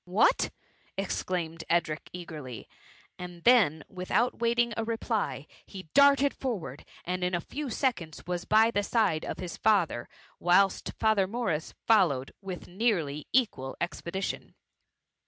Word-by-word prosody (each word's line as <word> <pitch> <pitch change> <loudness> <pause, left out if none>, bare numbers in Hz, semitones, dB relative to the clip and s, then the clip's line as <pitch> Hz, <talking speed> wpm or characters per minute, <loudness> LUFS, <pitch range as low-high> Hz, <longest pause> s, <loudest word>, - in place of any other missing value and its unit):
*^ - - -56
" - - -56
What 475 - +4 0.2
!'* - - -36
exclaimed 165 -3 -3
Edric, 165 -2 0
eagerly, 150 - -8 0.5
and 175 -1 -8
then, 200 -12 +5
without 190 +6 0
waiting 235 0 +2
a 225 - -1
reply, 225 0 -2 0.2
he 185 -5 -10
darted 280 0 +6
for 250 -6 -2
ward, 140 -3 -9 0.2
and 180 +1 -2
in 180 0 +1
a - - 0
few 285 - -5
seconds 220 - -2
was 175 0 -3
by 220 +1 +4
the 205 - +1
side 205 -7 +1
of - - -4
his 180 -2 -6
father: 190 - +2 0.3
whilst 185 +3 +3
Father 215 -3 +3
Morris 195 -8 -2
followed 170 - +3
with 190 -2 -7
nearly 175 - -1
equal 205 - 0
expedition. 180 +2 -4
185 Hz, 145 wpm, -29 LUFS, 165-225 Hz, 0.5 s, darted